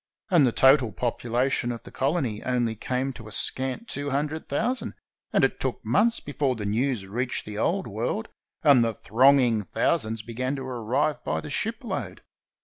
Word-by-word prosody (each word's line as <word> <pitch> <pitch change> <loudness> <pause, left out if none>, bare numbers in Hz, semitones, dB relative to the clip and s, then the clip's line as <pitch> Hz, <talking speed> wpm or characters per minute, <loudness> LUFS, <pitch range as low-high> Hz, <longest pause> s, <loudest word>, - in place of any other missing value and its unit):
And 160 -7 +6
the - - +2
total 130 -2 +5
population 120 +4 -1
of 115 - -7
the - - -12
colony 135 -6 -1
only 120 -3 0
came 130 +4 -2
to 115 -3 -11
a - - -10
scant 130 - -1
two 145 0 -4
hun 140 +2 +1
dred 155 +1 -7
thousand, 230 - -1 0.4
and - - +3
it - - +1
took - - -2
months 230 +2 +3
before 140 -2 -1
the 105 -3 -5
news 115 0 0
reached 120 +6 -3
the 105 0 -6
Old 190 - +1
World 120 - -3 0.4
and 140 -6 +6
the 115 -2 -1
thronging 120 -2 +4
thousands 110 +4 0
began 125 +4 -3
to 135 - -5
arrive 125 +4 -1
by 80 +2 -1
the - - -7
shipload. - - -3
125 Hz, 175 wpm, -26 LUFS, 115-140 Hz, 0.4 s, And